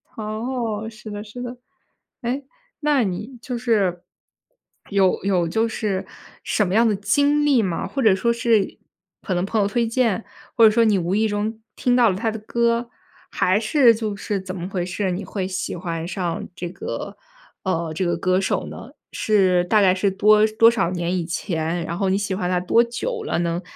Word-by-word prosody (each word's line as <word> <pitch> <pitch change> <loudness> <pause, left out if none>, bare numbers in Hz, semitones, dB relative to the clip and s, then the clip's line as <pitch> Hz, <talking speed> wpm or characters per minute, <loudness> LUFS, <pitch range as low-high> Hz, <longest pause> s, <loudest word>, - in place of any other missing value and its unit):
哦， 220 0 -3
是 215 0 -11
的 205 0 -6
是 220 +3 -9
的。 245 0 -6 0.6
诶， 260 +3 -3 0.4
那 290 -4 +3
你 210 +7 -4
就 250 -1 -4
是， 200 -7 +1 0.9
有 195 -3 +2
有 185 -4 +1
就 220 +7 +1
是 200 -4 -2 0.4
什 210 -3 +1
么 185 - -2
样 230 +1 +5
的 210 - +2
经 285 +9 +2
历 270 -6 +4
吗？ 180 -4 -2
或 275 - -3
者 215 -5 +5
说 235 +5 +1
是 230 -3 +1 0.4
可 185 - -3
能 175 +1 0
朋 215 +1 0
友 200 - +2
推 230 +3 0
荐， 230 -3 0 0.3
或 230 - +7
者 215 - +7
说 230 +1 +4
你 215 -3 +3
无 180 +2 -1
意 220 +1 +2
中 215 +2 -3
听 245 -1 +1
到 240 -3 +5
了 185 - 0
他 225 +3 -1
的 220 - -6
歌， 235 +2 0 0.4
还 185 +3 +2
是 235 +1 +5
就 215 -2 -3
是 200 -1 -3
怎 185 0 -6
么 175 0 -5
回 185 -3 -2
事？ 190 +1 -2
你 180 - -3
会 190 -3 -3
喜 185 0 -3
欢 170 -2 -4
上 185 +2 -3
这 175 - -5
个， 180 - -6 0.5
呃， 170 -4 -1
这 180 +3 -1
个 175 -1 0
歌 185 +2 +1
手 190 - -1
呢？ 235 - -9 0.2
是 190 -4 +3
大 215 +4 +3
概 185 -1 +4
是 195 +1 +1
多 210 +2 +5
多 230 - +9
少 195 -7 0
年 175 0 -1
以 170 - -2
前， 165 0 -2
然 170 0 -4
后 195 -1 0
你 190 - +2
喜 200 -2 -2
欢 180 -2 -2
他 180 -1 +1
多 230 +6 +3
久 445 - -4
了？ 170 - -1
能 170 +1 -1
205 Hz, 215 characters per minute, -22 LUFS, 185-230 Hz, 0.9 s, 多